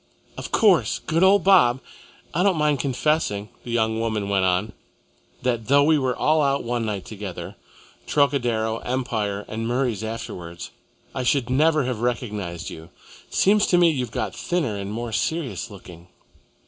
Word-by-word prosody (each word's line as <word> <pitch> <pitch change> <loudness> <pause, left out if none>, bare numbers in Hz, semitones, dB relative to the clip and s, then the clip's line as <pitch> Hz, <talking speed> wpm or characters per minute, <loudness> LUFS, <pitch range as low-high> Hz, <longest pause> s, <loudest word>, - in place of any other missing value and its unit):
"Of - - -7
course! 200 -7 +3
Good 165 +1 +1
old 190 0 +5
Bob! 155 -11 +5 0.5
I 170 - +1
don't 190 -3 +3
mind 150 -2 +2
confessing," 130 -5 0
the - - -9
young 110 -1 0
woman 110 -3 -2
went 95 -2 +2
on, 90 +3 0 0.7
"that 120 -3 -1
though 140 +2 +5
we 155 0 +4
were 130 -2 0
all 155 +1 +2
out 140 -1 +1
one 120 -1 -2
night 100 -3 -3
together 100 -4 -7 0.5
Trocadero, 120 -6 +1
Empire, 110 -5 -2
and 115 +1 -4
Murray's 120 -4 -1
afterwards 90 -7 -6 0.4
I - - -3
should 125 0 +1
never 155 +2 +3
have 125 -3 -3
recognised 105 -8 -3
you. 80 +1 -10 0.4
Seems 205 +2 +3
to 175 - +3
me 175 -1 +5
you've 125 -6 -2
got 105 -1 -3
thinner 125 -1 -1
and 100 0 -5
more 115 +2 -4
serious 125 - -2
looking." 90 -4 -13
120 Hz, 160 wpm, -23 LUFS, 105-145 Hz, 0.7 s, old